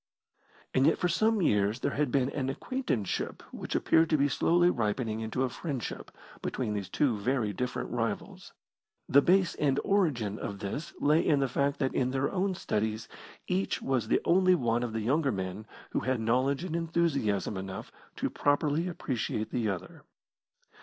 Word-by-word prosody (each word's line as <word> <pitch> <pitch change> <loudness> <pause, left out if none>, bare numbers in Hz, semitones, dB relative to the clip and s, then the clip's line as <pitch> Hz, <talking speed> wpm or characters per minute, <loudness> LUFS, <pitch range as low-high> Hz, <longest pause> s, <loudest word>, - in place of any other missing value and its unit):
And 130 +2 +4
yet 160 - +3
for 180 - +1
some 215 +3 +2
years 105 -1 +2
there - - 0
had 145 -3 0
been 135 0 +2
an 135 -2 -2
acquaintanceship 135 - -2
which - - -5
appeared 160 0 +3
to 155 - +3
be 140 0 +3
slowly 175 +6 +3
ripening 110 -2 -1
into 110 +4 -1
a - - +2
friendship 135 -2 -5 0.3
between 115 -5 -2
these 100 -3 -4
two 135 -6 +1
very 110 0 0
different 125 +5 -3
rivals. - - -3 0.6
The 140 - +6
base 185 +3 +3
and 140 -2 +1
origin 135 - +1
of 100 - -4
this 105 +11 -5
lay 150 +3 +3
in 145 - +3
the 135 - +2
fact 140 +3 0
that 135 -2 0
in 130 -1 +1
their 135 +1 0
own 190 0 0
studies 110 -4 -2 0.4
each 190 +1 0
was 130 -3 -1
the - - +2
only 185 +1 +5
one 120 -6 +1
of 120 -2 -3
the 110 - -1
younger 135 +5 +2
men 95 +1 -4 0.2
who - - 0
had 130 -2 -1
knowledge 130 +7 +1
and 175 -3 -3
enthusiasm 155 - 0
enough 95 0 -6 0.2
to - - -2
properly 145 +3 +1
appreciate 125 -10 -3
the 115 -3 0
other. 95 -3 -5
135 Hz, 175 wpm, -30 LUFS, 110-160 Hz, 0.6 s, The